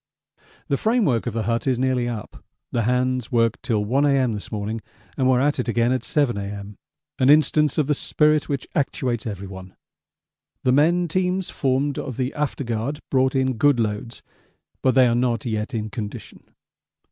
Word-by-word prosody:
The 140 - +1
framework 215 - +1
of - - -2
the 115 -1 -1
hut 115 +3 -1
is 130 -2 +2
nearly 125 -1 0
up; 110 -4 -7 0.3
the 120 - 0
hands 125 +1 0
worked 115 -2 +1
till 110 -4 0
1 135 +7 +2
A.M. 135 -4 +2
this 105 - -7
morning 110 +1 -3 0.3
and 130 -1 +2
were 125 -1 +4
at 145 +1 +1
it 125 - -1
again 120 +1 +2
at 130 - 0
7 135 -8 +1
A.M. 100 0 -6 0.4
an 130 - +4
instance 150 -1 +4
of 155 - +3
the 150 - +1
spirit 150 +1 +2
which 140 -3 -3
actuates 125 -6 -1
everyone. 95 -2 -8 0.9
The 130 - +3
men 170 +6 +3
teams 185 +2 -1
formed 135 +1 0
of 130 -5 -5
the 130 0 -1
after 145 -1 -2
guard 120 +5 -3
brought 130 0 +2
in 130 -2 +1
good 140 +1 +3
loads, 110 +1 -3 0.6
but 130 -1 +2
they 130 -1 +6
are 120 - +2
not 120 -2 0
yet 110 0 -2
in 110 -1 -3
condition. 105 -1 -7
125 Hz, 180 wpm, -23 LUFS, 115-140 Hz, 0.9 s, they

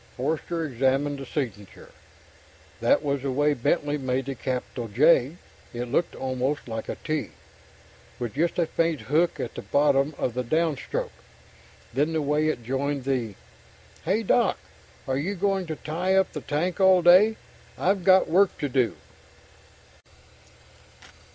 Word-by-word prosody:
Forster 160 +5 -2
examined 135 +2 0
the 135 - -8
signature. 105 -10 -6 0.9
That 120 +6 +3
was 140 -2 -1
the 135 0 -2
way 145 +3 +2
Bentley 145 +3 0
made 130 0 -1
the 135 - -3
capital 125 -2 -4
J 135 +5 +3 0.4
it 120 0 -4
looked 165 +5 0
almost 130 +2 -2
like 110 -1 -5
a - - -3
T, 155 -1 -3 0.9
with 120 -3 -4
just 165 +4 0
a 170 - +2
faint 165 -1 -1
hook 160 +5 +1
on - - -3
the - - -6
bottom 140 0 +2
of 125 - -1
the 125 +1 -2
down 160 +4 +1
stroke. - - -4 0.8
Then 145 +6 +1
the 160 - 0
way 150 +2 +1
it 125 -6 -2
joined 135 +3 -2
the 125 -6 -2 0.7
"Hey, 200 +7 0
Doc 225 0 +2 0.5
are 130 0 0
you 190 +8 -2
going 195 -1 0
to 160 - -3
tie 175 +6 -1
up 190 0 +2
the - - -5
tank 165 +6 -2
all 190 -2 +5
day? 190 +6 +6 0.4
I've 190 0 +1
got 190 +1 +5
work 190 +3 +3
to 145 -5 -2
do." 125 -7 +1
145 Hz, 150 wpm, -25 LUFS, 130-170 Hz, 0.9 s, day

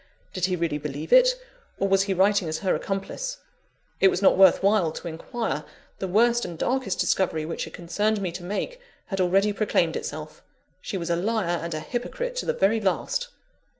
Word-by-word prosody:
Did 185 -2 0
he 185 -1 0
really 165 -4 -1
believe 150 +1 -4
it, - - +7 0.4
or 195 - +1
was 195 0 +4
he 195 0 0
writing 195 -2 +3
as 155 - -2
her 185 - +3
accomplice? 200 - -3 0.6
It 195 - +6
was 185 - +2
not 195 - +5
worth 190 -1 +6
while 200 -5 +3
to 165 - -7
inquire: 170 - -3 0.4
the 190 - -2
worst 235 +5 +3
and 170 -2 -5
darkest 250 -1 -1
discovery 160 -5 +1
which 165 - -4
it - - -12
concerned 205 +5 0
me 185 -3 -2
to 175 +1 -8
make, 345 - -4 0.2
had 195 -2 -2
already 195 +3 +3
proclaimed 180 -5 +1
itself 155 0 -6 0.4
she 195 - -4
was 170 -1 -3
a - - +3
liar 185 -2 0
and 165 -1 -4
a - - -2
hypocrite 485 - -4
to - - -3
the 480 - +2
very 220 - +2
last! - - 0
195 Hz, 195 wpm, -25 LUFS, 170-215 Hz, 0.6 s, it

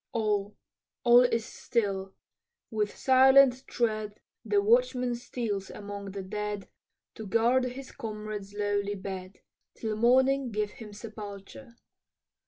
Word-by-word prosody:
All, 210 -3 0 0.5
all 240 0 +8
is 230 -2 +1
still 195 -6 -2 0.6
with 210 -2 -2
silent 265 0 +5
tread 215 -3 -2 0.2
The 410 - +2
watchman 405 - +2
steals 230 -5 -4
among 200 -1 -7
the 195 -1 -5
dead, 210 0 -4 0.5
To 220 - -8
guard 235 +5 +3
his 255 +2 -7
comrade's 210 -2 -6
lowly 205 0 -1
bed, 190 -1 -7 0.3
Till 220 -2 -3
morning 260 +3 +3
give 210 -1 -1
him 215 -1 -11
sepulture. 210 +3 -10
215 Hz, 115 wpm, -29 LUFS, 205-245 Hz, 0.6 s, all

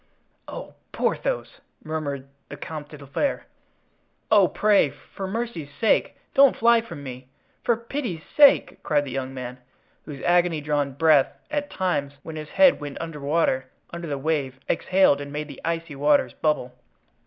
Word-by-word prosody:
"Oh! - - -8 0.2
Porthos!" - - -2 0.2
murmured 145 -4 -4 0.2
the 145 - -8
Comte 150 0 -7
de 150 - -10
la 140 - -12
Fere. 210 - -1 0.9
"Oh, 205 -4 +6
pray, 205 -7 +3
for 190 +7 -8
mercy's 210 -8 -4
sake, 225 - +2 0.2
don't 275 -1 +6
fly 235 0 +4
from 165 -10 -9
me. 130 -1 -8 0.4
For 235 - +2
pity's 230 - -4
sake!" 285 -2 +5
cried 145 -2 +1
the 135 - -6
young 130 0 -3
man, 125 -1 -7 0.5
whose 145 -3 -8
agony 175 -2 +3
drawn 145 -2 -1
breath 150 -1 +3
at 290 -1 -2
times, 145 -7 -1
when 160 0 -7
his 155 -1 -7
head 280 -2 +5
went 145 -1 -6
under 165 -2 -6
water, 140 -3 +1 0.2
under 170 0 -6
the 145 -2 -2
wave, 135 -3 -1
exhaled 185 -5 +3
and 140 0 -7
made 150 +1 -4
the - - -11
icy 165 -2 -3
waters 145 +1 +3
bubble. 150 -5 -1
155 Hz, 160 wpm, -24 LUFS, 140-190 Hz, 0.9 s, Oh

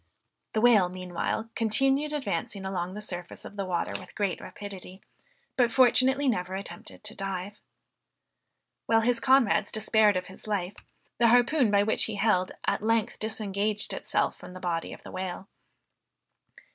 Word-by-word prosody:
The 215 - +1
whale, 220 -7 +5
meanwhile, 185 +5 -3
continued 270 +6 +2
advancing 245 -8 -3
along 185 -1 -3
the 210 - -5
surface 175 -4 -6
of - - -10
the 200 -1 -3
water 180 -2 -1
with 185 - -13
great 200 -3 -1
rapidity, 195 -2 -9 0.5
but 245 -2 +3
fortunately 265 +3 +4
never 185 -6 0
attempted 210 +3 -9
to 210 0 -5
dive. 195 +1 -5 1.3
While 225 0 +4
his 235 +1 +2
comrades 260 -3 +3
despaired 215 -2 +3
of 180 - -3
his 190 +3 -13
life, 200 -3 -1 0.5
the 235 - +5
harpoon 245 +2 +4
by 200 0 +4
which 220 - +3
he 220 - -3
held, 195 -3 +2
at - - 0
length 225 0 0
disengaged 210 -1 -1
itself - - -1
from - - -11
the 185 - -8
body 170 -2 -2
of - - -11
the - - -10
whale. 185 0 -5
210 Hz, 155 wpm, -28 LUFS, 185-230 Hz, 1.3 s, whale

